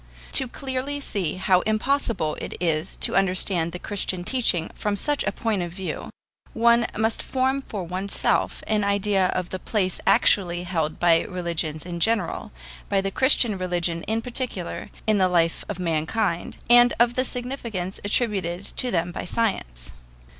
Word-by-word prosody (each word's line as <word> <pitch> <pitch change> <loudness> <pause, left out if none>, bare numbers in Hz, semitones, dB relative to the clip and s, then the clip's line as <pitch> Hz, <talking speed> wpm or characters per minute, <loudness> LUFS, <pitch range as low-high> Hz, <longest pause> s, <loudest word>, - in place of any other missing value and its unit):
To 265 - +5
see - - -10
clearly 260 - -3
how 185 -1 +3
impossible 220 - 0
it - - -5
is 160 -3 -1
to - - +1
understand 185 -3 +1
the 180 - -5
Christian 185 -1 -2
teaching 180 -8 +1
from 210 -1 -2
such 290 +8 -1
a 205 - +1
point 215 -2 -1
of 175 -1 -4
view, 185 +1 -5 0.4
one 235 +1 +4
must 220 +1 0
form 265 +1 0
for 205 -7 -5
oneself 185 +3 -1
an 215 -1 +1
idea 200 -1 +2
of 180 -1 -2
the 185 - -4
place 190 -4 -1
actually 175 -3 +4
held 160 -4 -2
by 170 -1 +5
religions 170 -4 -3
in 175 -1 -5
general, 215 -1 0 0.4
by 200 - +2
the 195 0 -1
Christian 240 -5 +3
religion 175 -2 -1
in 225 +1 0
particular, 240 -7 -4 0.2
in 215 -2 +3
the 185 -1 +4
life 170 -2 +1
of 205 - -3
mankind, 170 +2 -1
and 240 +1 +6
of 240 0 +4
the 255 - +1
significance 240 -8 -4
attributed 200 -4 -1
to 255 - +2
them 175 -4 0
by - - -5
science. - - -2
195 Hz, 160 wpm, -24 LUFS, 175-230 Hz, 0.4 s, and